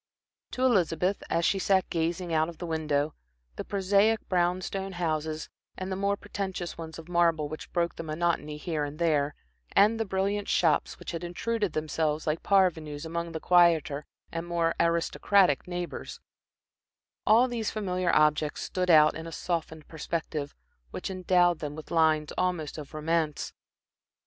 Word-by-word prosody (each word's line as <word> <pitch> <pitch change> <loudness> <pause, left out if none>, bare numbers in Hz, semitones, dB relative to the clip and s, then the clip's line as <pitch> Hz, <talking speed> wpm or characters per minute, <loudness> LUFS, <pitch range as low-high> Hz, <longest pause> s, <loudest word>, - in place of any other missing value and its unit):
To 255 - -1
Elizabeth, 185 -4 +2
as 170 0 +1
she 195 - +2
sat 190 -1 +2
gazing 170 +1 -1
out 160 +1 +2
of 170 - -10
the 175 - -5
window, 155 -2 0 0.4
the - - -4
prosaic 200 +3 +2
brown 180 0 +1
stone 195 +1 -4
houses, 155 -3 -2 0.3
and 185 0 -4
the - - -1
more 200 +1 0
pretentious 195 -4 -4
ones 160 -1 -8
of 165 0 -10
marble 170 -3 +2
which 155 +1 -8
broke 170 -1 -1
the - - -4
monotony 155 -1 -1
here 155 -1 -2
and 145 +1 -5
there, 150 -3 +1 0.4
and 215 +3 +5
the 225 - 0
brilliant 195 +1 -1
shops, 165 -3 +2
which - - -7
had 165 0 -5
intruded 205 +2 -2
themselves 155 0 -1
like 155 +1 -1
parvenus 165 -6 +1
among 170 +1 -3
their 160 - -4
quieter 165 -4 +3 0.2
and 165 +1 -4
more 170 -1 +1
aristocratic 170 0 +2
neighbors 175 -1 -5 1.1
all 230 +4 +6
these 235 -3 -2
familiar 185 -4 -1
objects 150 0 +2
stood 180 -1 -2
out 155 -2 +7
in 160 +1 -6
a - - -7
softened 160 -2 -4
perspective, 155 -2 -4 0.3
which 190 - -5
endowed 180 -2 +3
them 150 -1 -5
with 155 - -10
lines 155 -2 +2
almost 170 -4 -1
of 150 +1 -9
romance. 155 -1 -1
170 Hz, 160 wpm, -28 LUFS, 155-185 Hz, 1.1 s, out